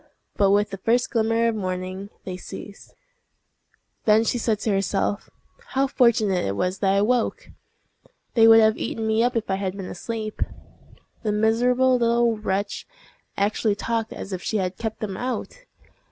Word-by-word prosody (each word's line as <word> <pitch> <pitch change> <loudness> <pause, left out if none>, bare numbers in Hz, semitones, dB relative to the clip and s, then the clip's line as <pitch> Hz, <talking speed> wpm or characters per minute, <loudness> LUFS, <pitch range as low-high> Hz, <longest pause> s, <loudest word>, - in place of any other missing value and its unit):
But 200 -1 +3
with 205 +1 +2
the 195 - -6
first 240 +5 +1
glimmer 225 0 +2
of 230 - +1
morning 185 0 -4
they 185 - -5
ceased. 195 +2 -10 1.1
Then 215 +1 +5
she 240 +2 0
said 220 -2 +1
to 220 - 0
herself, 195 +1 -1 0.4
"How 270 +1 +1
fortunate 225 -8 +2
it 100 - -2
was 185 - -1
that 195 -1 +2
I 200 +1 +3
woke! 240 +1 0 0.8
They 225 -2 +6
would 225 0 +9
have 220 0 +3
eaten 225 - -3
me 220 +1 +2
up 245 +1 +1
if 225 -1 -1
I 190 - 0
had 195 0 -3
been 195 - -5
asleep." 215 +3 -5 0.8
The 215 - -1
miserable 245 +4 +3
little 235 0 +2
wretch 200 -1 -3 0.5
actually 205 +1 +1
talked 225 +1 -2
as 195 - -7
if 185 - -4
she 220 - -1
had 185 -2 -2
kept 220 -1 -4
them 195 -3 -4
out! 260 - -5
215 Hz, 170 wpm, -24 LUFS, 195-230 Hz, 1.1 s, would